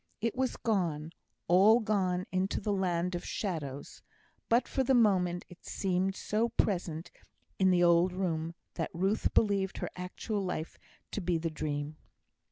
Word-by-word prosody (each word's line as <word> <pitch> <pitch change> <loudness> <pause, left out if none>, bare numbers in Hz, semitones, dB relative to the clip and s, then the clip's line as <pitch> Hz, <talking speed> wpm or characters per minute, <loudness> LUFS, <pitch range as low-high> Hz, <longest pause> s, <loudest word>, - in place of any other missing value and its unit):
It 230 0 -1
was 260 -1 -1
gone 170 -9 -1 0.4
all 200 +6 +6
gone 190 -5 0
into 185 +1 0
the 205 0 -1
land 180 -2 0
of 175 - -3
shadows; 150 -9 -4 0.5
but 235 +2 +3
for 265 - 0
the 265 +1 +3
moment 185 -6 +3
it 180 - -15
seemed 190 0 -1
so 220 +4 0
present 175 -7 -1 0.5
in 190 -1 +5
the 180 -1 +4
old 170 +1 +5
room, 170 -3 -2 0.2
that - - -2
Ruth 195 +5 +1
believed 200 -3 +2
her - - -4
actual 195 +3 -3
life 175 -3 -4 0.3
to 205 - -3
be 175 -1 +1
the 165 0 -2
dream. 150 0 -3
185 Hz, 155 wpm, -31 LUFS, 170-205 Hz, 0.5 s, all